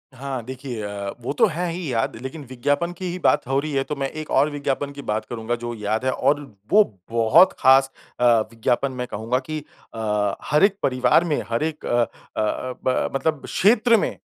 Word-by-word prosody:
हाँ, 130 -2 -5
देखिए 130 -2 -6
अ, 100 -1 -4
वो 125 - -3
तो - - +7
है 175 0 -2
ही 165 -4 -4
याद, 115 -1 0
लेकिन 130 +4 -7
विज्ञापन 145 +7 0
की 185 - -5
ही 180 - -4
बात - - +3
हो 135 +1 +2
रही 155 +2 -3
है 135 -1 +1
तो 150 - -4
मैं 135 -1 -2
एक 155 0 -7
और 140 +3 +4
विज्ञापन 140 -1 -2
की 140 0 -9
बात 110 -4 -2
करूँगा 120 0 -2
जो 120 0 -3
याद 110 +3 -2
है, 130 - +2
और 145 +3 +1 0.3
वो 215 +1 +7 0.3
बहुत 115 +10 +5
खास 135 0 +5 0.3
अ, - - 0 0.3
विज्ञापन 120 +4 0
मैं 125 -1 -4
कहूँगा 115 +4 -1
कि 155 0 -2 0.3
अ, 105 -2 -1 0.2
हर 150 - +4
एक 200 0 +5
परिवार 125 +4 +3
में, 155 -4 0
हर 115 +4 0
एक 155 -1 -4
अ 120 0 +2 0.4
अ - - +2
अ, 125 +4 -2
ब 130 - +1
मतलब 145 +1 0
क्षेत्र 230 +3 +4
में - - 0
135 Hz, 210 wpm, -23 LUFS, 120-150 Hz, 0.4 s, तो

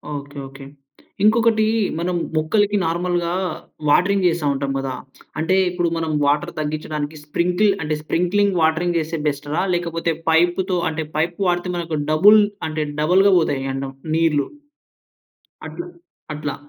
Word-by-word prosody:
Okay. 145 0 -8
Okay. 135 0 -12 0.6
ఇంకొకటీ, 220 0 +4 0.3
మనం 180 +1 -1 0.2
మొక్కలకి 205 +7 +2
నార్మల్‌గా 175 +1 -1 0.6
వాటరింగ్ 190 +5 +3
చేస్తా 165 -2 0
ఉంటాం 140 0 -2
కదా! 135 -1 -3 0.5
అంటే 165 +4 +1
ఇప్పుడు 175 -1 -1
మనం 160 -1 -2
వాటర్ 150 +4 +1
తగ్గించడానికి 150 0 -3
స్ప్రింకిల్ 180 +7 +1
అంటే 155 0 -1
స్ప్రింక్లింగ్ 185 +4 +1
వాటరింగ్ 170 +2 +2
చేస్తే 160 +1 -3
బెస్టా? 145 +1 -3 0.2
లేకపోతే 165 -1 -1 0.2
పైప్‌తో 175 +3 +2 0.4
పైప్ 170 +2 -1
వాడితే 175 +1 0
మనకు 165 -2 -3
డబుల్ 205 +7 +7 0.3
అంటే 155 0 -2 0.2
డబుల్‌గా 190 +5 +4
పోతాయి 140 -5 -1
అంట 135 0 -4 0.2
నీళ్ళు, 160 -3 +2 1.2
అట్లా 350 +1 -7 0.5
అట్లా. 150 -1 -4
165 Hz, 120 wpm, -21 LUFS, 150-180 Hz, 1.2 s, డబుల్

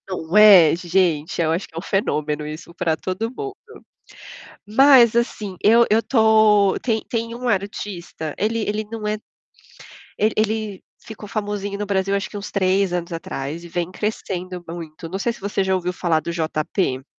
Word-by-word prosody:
Não, 175 -1 -4
é 200 -7 +8
gente, 170 -3 0
eu 160 -1 +1
acho 170 +4 -2
que - - -23
é - - -7
um - - -3
fenômeno 155 -7 -1
isso 155 +3 -8
pra 170 -2 0
todo 190 +7 -3
mundo. 400 - -6 1.1
Mas 245 0 +6
assim, 215 -5 -1
eu 230 +3 +6
eu 220 +2 +4
tô, 215 -4 +4
tem 220 -3 0
tem 230 0 -2
um 250 +1 -5
artista, 190 -6 -3
ele 225 +2 0
ele 210 +1 -1
não 220 -2 -4
é 210 0 -1
tão 215 - -24 0.9
ele 215 +1 +2
ele 215 -2 -1 0.2
ficou 220 -1 -10
famosinho 205 -1 -3
no 210 - -3
Brasil 195 0 0
acho 200 -1 -2
que 205 - -7
uns 200 +1 -7
3 190 -1 +1
anos 175 0 -3
atrás 165 -1 -5
e - - -9
vem 175 +1 -3
crescendo 185 -3 -4
muito, 165 -1 -8
não 190 +3 -4
sei 235 +3 -1
se - - -15
você 200 0 -1
já 190 0 +1
ouviu 180 0 -2
falar 170 -3 +1
do 170 - -4
JP? 155 -4 -2
195 Hz, 180 wpm, -21 LUFS, 170-215 Hz, 1.1 s, é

